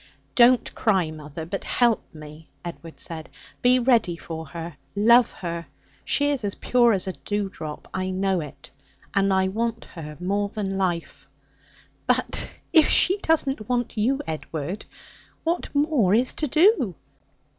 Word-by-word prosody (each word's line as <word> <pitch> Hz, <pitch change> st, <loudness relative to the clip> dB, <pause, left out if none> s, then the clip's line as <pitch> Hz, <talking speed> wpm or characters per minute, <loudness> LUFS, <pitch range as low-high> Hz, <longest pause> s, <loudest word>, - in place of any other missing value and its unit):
'Don't 245 Hz, 0 st, +4 dB
cry, 190 Hz, -7 st, +1 dB
mother, 155 Hz, +1 st, -8 dB
but 195 Hz, +4 st, -4 dB
help 235 Hz, -3 st, +2 dB
me,' 155 Hz, 0 st, -12 dB, 0.2 s
Edward 165 Hz, -1 st, -9 dB
said. 160 Hz, -2 st, -6 dB, 0.3 s
'Be 250 Hz, +1 st, +5 dB
ready 235 Hz, -9 st, +2 dB
for 160 Hz, -1 st, -7 dB
her, 165 Hz, +2 st, -7 dB, 0.2 s
love 235 Hz, +4 st, +6 dB
her. 170 Hz, -2 st, -6 dB, 0.4 s
She 290 Hz, 0 st, +2 dB
is 275 Hz, -5 st, -2 dB
as 200 Hz, -1 st, -2 dB
pure 240 Hz, -2 st, +3 dB
as 190 Hz, -, -1 dB
a 190 Hz, -, -2 dB
dew 205 Hz, +1 st, -3 dB
drop. 155 Hz, -5 st, -8 dB
I 185 Hz, 0 st, -2 dB
know 190 Hz, -1 st, 0 dB
it. 150 Hz, -3 st, -11 dB, 0.4 s
And 195 Hz, 0 st, +2 dB
I 190 Hz, 0 st, +2 dB
want 230 Hz, +3 st, -2 dB
her 150 Hz, -3 st, -8 dB
more 200 Hz, +3 st, -1 dB
than 200 Hz, -2 st, -3 dB
life.' 180 Hz, -3 st, -2 dB, 0.8 s
'But -, -, +3 dB, 0.2 s
if 320 Hz, -3 st, +6 dB
she 380 Hz, +2 st, +5 dB
doesn't 280 Hz, -, 0 dB
want 245 Hz, -1 st, -1 dB
you, 245 Hz, +6 st, +1 dB
Edward, 160 Hz, +3 st, -5 dB, 0.6 s
what 335 Hz, +2 st, -1 dB
more 285 Hz, -, +3 dB
is 250 Hz, +3 st, +2 dB
to 305 Hz, -, 0 dB
do?' 310 Hz, -, +3 dB
195 Hz, 150 wpm, -24 LUFS, 170-245 Hz, 0.8 s, love